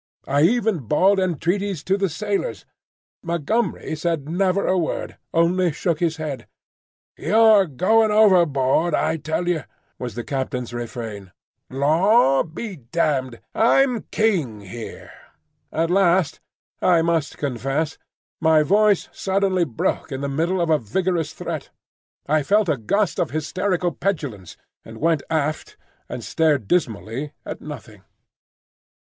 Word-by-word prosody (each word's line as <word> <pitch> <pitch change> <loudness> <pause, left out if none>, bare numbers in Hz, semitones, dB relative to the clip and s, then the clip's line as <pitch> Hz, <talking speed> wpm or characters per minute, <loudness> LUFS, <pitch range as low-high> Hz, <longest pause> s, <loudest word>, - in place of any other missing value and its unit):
I 140 +1 +2
even 220 +1 +2
bawled 185 - +3
entreaties 185 0 -1
to 190 - +1
the 195 -1 0
sailors. 205 - -3 0.6
Montgomery 170 +3 -1
said 155 -2 -2
never 185 +3 +1
a 185 - +2
word, 175 -3 -3
only 170 +1 +2
shook 165 +1 -1
his 165 -2 0
head. 155 -4 -5 0.7
"You're 215 -3 +5
going 215 - +3
overboard, 170 -7 +3
I 160 +1 0
tell 160 +3 -2
you," 170 -5 0 0.4
was 125 -2 -5
the 120 - -4
captain's 130 -3 -3
refrain. 115 -5 -6 0.4
"Law 150 - +3
be 185 +4 -6
damned! 130 -2 -1
I'm 245 +1 +3
king 165 - 0
here." 110 +4 -9 0.6
At 165 +2 0
last 180 -4 +3 0.4
I 170 -3 +4
must 165 -3 0
confess 140 +4 -2 0.4
my 160 -1 +4
voice 205 +3 +3
suddenly 190 -2 0
broke 130 +2 -2
in 135 0 -4
the 140 - -2
middle 165 +6 0
of 170 -1 +1
a 155 - +4
vigorous 165 - -1
threat. 160 -3 -6 0.6
I 155 +1 +2
felt 205 +6 +2
a 150 - +1
gust 200 - 0
of 165 - 0
hysterical 175 +5 -1
petulance, 135 - -4 0.3
and 110 0 -11
went 160 +2 +1
aft 155 -1 -2 0.3
and - - -6
stared 150 -9 +1
dismally 130 - -1
at - - -6
nothing. 110 -9 -10
165 Hz, 130 wpm, -22 LUFS, 140-190 Hz, 0.7 s, You're